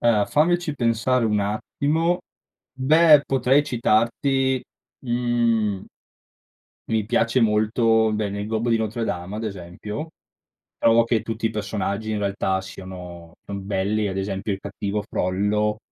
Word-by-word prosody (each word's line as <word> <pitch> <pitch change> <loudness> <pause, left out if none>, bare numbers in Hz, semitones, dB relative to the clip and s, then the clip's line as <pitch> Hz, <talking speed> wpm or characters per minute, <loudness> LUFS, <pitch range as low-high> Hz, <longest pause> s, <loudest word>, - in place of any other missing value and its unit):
Eh, 110 -3 +3
fammici 170 +1 +1
pensare 120 0 +1
un 105 -2 +1
attimo. 150 - 0 0.5
Beh 150 +3 +5
potrei 135 +2 +3
citarti, 130 +3 +1 0.4
mhmm 120 -4 0 1.0
Mi 110 -2 0
piace 115 +3 +1
molto, 110 0 +3
beh 105 -1 -1
nel 100 +1 -4
gobbo 110 +2 -1
di 115 - +4
Notre-Dame 110 -4 -3
ad 110 - -4
esempio, 105 - -6 0.7
trovo 115 0 +4
che 115 -2 0
tutti 115 0 -3
i - - -1
personaggi 105 0 -3
in 105 - -1
realtà 100 -1 -1
siano 90 -3 -10
son 100 -1 -6
belli, 105 +2 0
ad 95 0 -3
esempio 95 +1 -2
il 95 - -3
cattivo 100 +1 -3
Frollo. 105 +3 0
110 Hz, 130 wpm, -23 LUFS, 100-120 Hz, 1.0 s, Beh